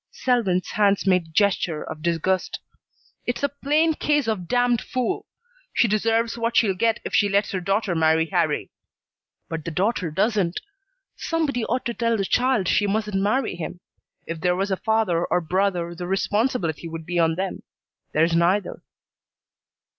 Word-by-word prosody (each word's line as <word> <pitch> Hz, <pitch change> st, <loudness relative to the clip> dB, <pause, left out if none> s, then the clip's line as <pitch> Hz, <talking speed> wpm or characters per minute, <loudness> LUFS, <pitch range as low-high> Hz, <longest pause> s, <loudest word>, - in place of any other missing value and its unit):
Selwyn's 215 Hz, -8 st, 0 dB
hands 200 Hz, -1 st, +2 dB
made 180 Hz, -4 st, +2 dB
gesture 180 Hz, -4 st, +1 dB
of 155 Hz, -, -8 dB
disgust. 170 Hz, +3 st, 0 dB, 0.7 s
"It's 245 Hz, +3 st, -2 dB
a 285 Hz, -, +3 dB
plain 300 Hz, +3 st, +1 dB
case 295 Hz, -4 st, +1 dB
of 200 Hz, -6 st, -2 dB
damned 245 Hz, 0 st, +2 dB
fool. 255 Hz, +10 st, -2 dB, 0.5 s
She 235 Hz, -, +3 dB
deserves 225 Hz, +2 st, +1 dB
what 230 Hz, 0 st, 0 dB
she'll 200 Hz, -4 st, +4 dB
get 225 Hz, +4 st, +1 dB
if -, -, -5 dB
she 205 Hz, -, +3 dB
lets 200 Hz, +1 st, +1 dB
her 190 Hz, -, -1 dB
daughter 195 Hz, +1 st, 0 dB
marry 160 Hz, 0 st, +3 dB
Harrie. 160 Hz, -, -1 dB, 0.8 s
But 160 Hz, -1 st, -5 dB
the -, -, -4 dB
daughter 185 Hz, +1 st, 0 dB
doesn't. 195 Hz, +1 st, 0 dB, 0.6 s
Somebody 305 Hz, -7 st, -1 dB
ought 255 Hz, -, -2 dB
to 235 Hz, -, -1 dB
tell 230 Hz, -1 st, 0 dB
the 195 Hz, -, -1 dB
child 250 Hz, -4 st, +1 dB
she 205 Hz, -, +2 dB
mustn't 210 Hz, -1 st, -1 dB
marry 220 Hz, +2 st, 0 dB
him. 175 Hz, +1 st, -6 dB, 0.5 s
If 165 Hz, -1 st, -6 dB
there 180 Hz, +1 st, +2 dB
was 195 Hz, +2 st, -1 dB
a 190 Hz, -, +1 dB
father 215 Hz, -7 st, +1 dB
or 180 Hz, -, +1 dB
brother 175 Hz, 0 st, -1 dB
the 175 Hz, +1 st, -6 dB
responsibility 195 Hz, -, 0 dB
would 165 Hz, -1 st, -7 dB
be 175 Hz, +1 st, -1 dB
on 165 Hz, -1 st, +3 dB
them. 190 Hz, +2 st, -3 dB, 0.5 s
There's 165 Hz, +2 st, +2 dB
neither." 180 Hz, +4 st, +1 dB
195 Hz, 160 wpm, -23 LUFS, 175-230 Hz, 0.8 s, she'll